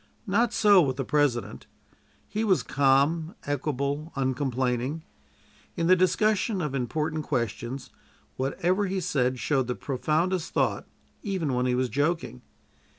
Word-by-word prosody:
Not 230 +3 +2
so 205 -5 +6
with 135 -5 0
the 135 0 -3
President. 135 -8 0 0.6
He 215 +2 -2
was 195 -5 +2
calm, 145 - +2
equable, 145 +2 -2
uncomplaining. 130 +1 -1 0.7
In 170 - 0
the 185 +2 +6
discussion 195 +2 +2
of 150 -5 -2
important 155 +4 -2
questions, 125 0 -3 0.4
whatever 175 +9 0
he 190 +1 -1
said 130 -8 0
showed 130 +1 0
the 125 - -2
profoundest 160 +6 -1
thought, - - 0 0.3
even 185 - -2
when 125 0 +1
he 125 - +1
was 130 0 +1
joking. 145 - -1
145 Hz, 130 wpm, -27 LUFS, 130-180 Hz, 0.7 s, so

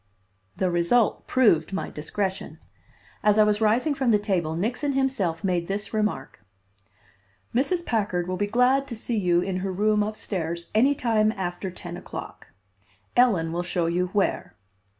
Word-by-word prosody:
The 185 -1 +1
result 175 +7 +2
proved 200 -10 +3
my 195 - -3
discretion. 190 +5 -4 0.6
As 210 0 +3
I 215 - +7
was 210 0 +1
rising 235 +8 +2
from 265 -3 0
the 215 - +5
table 180 -6 -1
Nixon 245 - -1
himself 250 -12 0
made 175 -3 0
this 205 +3 -4
remark: 210 -11 -2 1.1
"Mrs. 340 +8 +1
Packard 200 -6 -1
will 185 - -2
be 205 +2 -1
glad 250 +5 +2
to 235 - -5
see 230 +2 -4
you 175 -2 +2
in 185 0 -2
her 190 +1 -2
room 210 +3 +2
up 215 +1 -2
stairs 170 -5 -4
any 260 +7 +4
time 220 -4 +2
after 185 -1 -4
ten 175 -1 -8
o'clock. - - -9 0.7
Ellen 195 -10 +3
will 175 - -1
show 175 -1 -1
you 175 +2 0
where." 190 -2 -1
205 Hz, 160 wpm, -25 LUFS, 175-230 Hz, 1.1 s, I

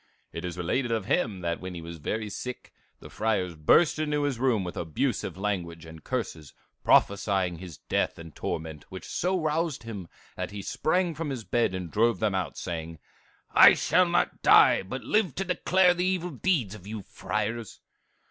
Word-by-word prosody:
"It 85 - -5
is 90 0 -5
related 115 +8 -1
of 110 -4 -1
him 110 - 0
that 85 -1 -2
when 90 -1 -6
he 85 - -6
was 85 0 -8
very 110 +8 -3
sick, 125 +5 -7 0.3
the - - -11
friars 105 -5 0
burst 150 - +4
into 150 -1 0
his 140 -5 -1
room 120 -6 +2
with 90 - -6
abusive 80 +2 -2
language 90 -5 -3
and 80 -1 -12
curses, 85 - -4 0.3
prophesying 95 -4 +3
his 85 -5 -9
death - - -1
and 85 -2 -10
torment, 80 0 -5
which 95 - -8
so 185 +2 -1
roused 155 -4 -1
him 105 -6 -7 0.3
that - - -4
he 100 -1 -7
sprang 175 - 0
from 155 0 -4
his 130 -5 -4
bed 115 -4 +1
and 90 -3 -5
drove 115 0 +2
them 105 -2 +1
out, 90 -6 -2
saying, 80 -1 -5 0.5
'I - - +9
shall 180 -1 +3
not 175 +1 0
die, - - +6
but 130 +8 -6
live 210 -8 +1
to 195 - -2
declare 180 0 +3
the 175 0 -1
evil 180 -1 0
deeds 135 - 0
of 100 -3 -11
you 105 -1 -6
friars. 110 +3 -4
105 Hz, 185 wpm, -27 LUFS, 90-150 Hz, 0.5 s, I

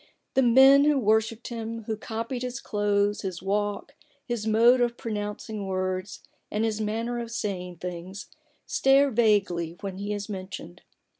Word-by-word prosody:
The 265 - +4
men 265 +3 +7
who 300 -1 +4
wor 220 -3 +4
shipped 225 +1 -8
him, 230 -1 -5
who 220 +1 -3
copied 230 +3 -5
his 250 +1 -4
clothes, 205 -2 0
his 185 -3 -5
walk, 205 +6 -2 0.3
his 235 -3 -3
mode 235 +3 +5
of 240 -1 +1
pronouncing 210 -1 -4
words, 185 0 -3 0.3
and 215 +2 0
his 220 -1 -1
manner 230 +3 -2
of 235 -1 -5
saying 185 -6 -4
things, 180 +3 -7 0.4
stare 275 +1 +4
vaguely 195 -7 +1
when 195 -1 -5
he 205 +1 -3
is 205 -1 -3
mentioned. 185 -3 -7
215 Hz, 155 wpm, -26 LUFS, 195-235 Hz, 0.4 s, men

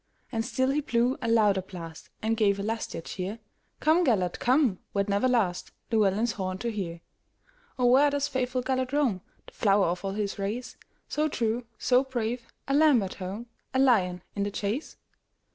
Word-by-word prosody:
And 225 -1 -1
still 260 +3 0
he 295 +2 +1
blew 245 -2 +1
a 230 - -2
louder 210 -4 +4
blast, 165 -4 -10
And 225 +1 +1
gave 205 -3 +3
a - - -2
lustier 220 -5 -3
cheer:"Come, 225 - -2
Gêlert, 195 - +1
come, 250 -6 +3 0.2
wert 200 0 +1
never 200 +5 +2
lastLlewelyn's 215 0 +1
horn 185 -2 -3
to 235 +4 -2
hear."O, 235 - -7
where 265 +4 +6
doth 285 0 0
faithful 255 -1 -1
Gêlert 260 0 -1
roam, 255 -11 +1 0.2
The - - -15
flower 200 -2 +3
of 175 +2 -2
all 195 0 -2
his 205 -1 -3
race, 215 +6 -3 0.3
So 305 +1 0
true, 235 -3 -1
so 250 +1 +3
brave,—a 245 +1 -4
lamb 290 -6 +5
at 190 - -4
home,A 215 +7 -7
lion 190 -10 +3
in 200 - -2
the 200 - 0
chase?" 205 +8 -3
225 Hz, 160 wpm, -28 LUFS, 200-255 Hz, 0.3 s, where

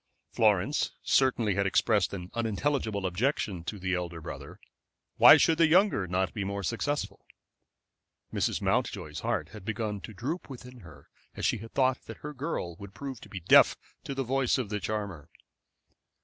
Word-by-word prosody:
Florence 110 +5 +2
certainly 120 -6 +2
had 100 +1 +1
expressed 105 0 +2
an 90 -2 -7
unintelligible 115 -2 -1
objection 95 - -1
to 105 +3 -4
the 95 -1 -2
elder 90 -2 -3
brother. 80 - -9 0.6
Why - - +10
should 165 0 +3
the 165 - +6
younger 175 - +3
not 90 +1 -1
be 105 - -3
more 100 +1 -3
successful? 145 - -2 1.1
Mrs. - - -1
Mountjoy's - - -1
heart - - -2
had 105 - -11
begun 105 -1 -3
to 95 - -8
droop 145 - -4
within 125 -1 -10
her 75 - -15 0.3
as - - -3
she - - +1
had 115 +2 -11
thought 130 -1 +2
that - - -9
her 150 - -5
girl 130 - -4
would 100 -1 -11
prove 135 -4 -6 0.3
deaf - - +7 0.3
to 140 - -5
the 135 - -1
voice 130 +1 +1
of 125 -6 -3
the 105 0 -2
charmer. 100 -8 -4
110 Hz, 165 wpm, -29 LUFS, 95-135 Hz, 1.1 s, Why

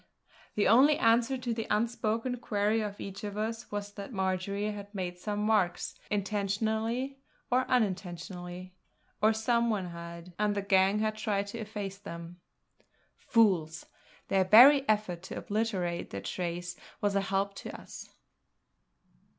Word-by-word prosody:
The 210 - +3
only 275 +7 +6
answer 235 0 +3
to 245 -2 -2
the 225 -1 -4
unspoken 230 +2 0
query 215 -2 0
of 205 -1 -5
each 195 +1 -7
of 205 0 -5
us 225 +2 -3
was 205 0 -4
that 200 +4 -8
Marjory 200 +1 -1
had 205 0 -9
made 180 -2 -4
some 205 +2 -3
marks, 210 -5 +1 0.2
intentionally 220 +6 -1 0.3
or 255 +1 +2
unintentionally 180 -4 -2 0.5
or 215 +1 +5
some 235 +2 +1
one 195 -5 -1
had; 170 +1 -9
and 210 -1 +1
the 200 - -1
gang 195 0 +4
had 215 0 0
tried 205 -2 0
to 230 - -6
efface 205 -3 -5
them. 170 -3 -9 0.8
Fools! 175 -8 +2 0.4
their 195 -1 +3
very 265 +8 +8
effort 210 -5 +1
to 185 - -7
obliterate 200 -5 -2
their 100 - -5
trace 175 0 -4 0.2
was 205 -1 0
a 200 - +3
help 195 +1 -1
to - - -7
us. - - -10
205 Hz, 140 wpm, -30 LUFS, 185-225 Hz, 0.8 s, very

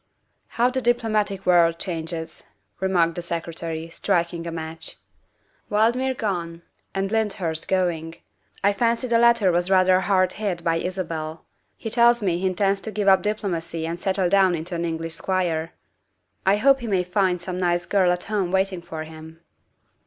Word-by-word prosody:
" - - -47
How 245 +2 +3
the 260 0 -1
diplomatic 215 -5 0
world 170 -2 +4
changes," 165 -2 -5 0.3
remarked 175 -3 +2
the 175 - -5
Secretary, 165 -1 -4
striking 170 0 -1
a - - -3
match. 160 0 -7 0.2
' - - -44
' - - -38
Valdmir 240 +5 +2
gone, 170 -5 -3 0.3
and 195 +1 -1
Lynd 220 -2 +1
hurst 165 -5 -3
going. 170 -3 -1 0.5
I 200 +1 +4
fancy 235 +4 0
the 235 -1 +3
latter 235 -5 +4
was 175 +1 0
rather 185 -1 +5
hard 185 -1 +2
hit 180 -5 -2
by 165 -1 +1
Isabel; 165 -3 -4 0.3
he 225 - -6
tells 235 -1 +4
me 175 -3 +1
he 190 - 0
intends 195 +1 +1
to 220 - -5
give 205 -1 -2
up 190 -1 +6
diplomacy 175 -6 -3
and 165 +1 -4
settle 190 -1 0
down 190 -1 +4
into 165 +3 -6
an 170 0 -2
English 165 0 -3
squire. 165 -2 -1 0.8
I 195 - +6
hope 270 +5 +4
he 240 - -6
may 190 -4 +1
find 180 0 +1
some 180 +1 -5
nice 175 -1 +1
girl 185 0 +3
at 180 0 -2
home 200 -4 -1
waiting 190 -1 0
for 160 -2 -6
him." 160 +1 -12
185 Hz, 175 wpm, -23 LUFS, 170-200 Hz, 0.8 s, up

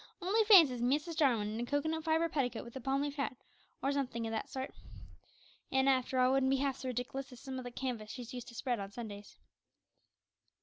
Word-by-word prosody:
Only 415 +5 +2
fancy 345 - +8
Mrs 295 +7 0
Jarwin 250 -9 +3
in 215 +2 -4
a 240 - -1
cocoanut 315 +3 0
fibre 325 +1 +3
petticoat 250 -7 -1
with 235 - -11
a 265 - -5
palm 275 +2 0
leaf 290 0 -4
hat, 275 -2 -1 0.5
or 275 - +2
somethink 255 -5 -2
o' 225 - -3
that 220 - -3
sort! 265 0 -5 1.0
An', 265 0 +3
after 260 -1 +2
all, 255 0 +5
it - - +3
wouldn't 270 -1 +3
be 270 - +4
half 270 -1 0
so 260 - -6
rediklous 255 +3 -4
as 250 - -11
some 260 +1 -5
o' - - -4
the 245 - -6
canvas 240 -4 -4
she's 245 0 -7
used 245 -2 -6
to 235 - -11
spread 245 -2 -1
on 195 0 -5
Sundays." 205 -2 -8
265 Hz, 220 wpm, -34 LUFS, 240-280 Hz, 1.0 s, fancy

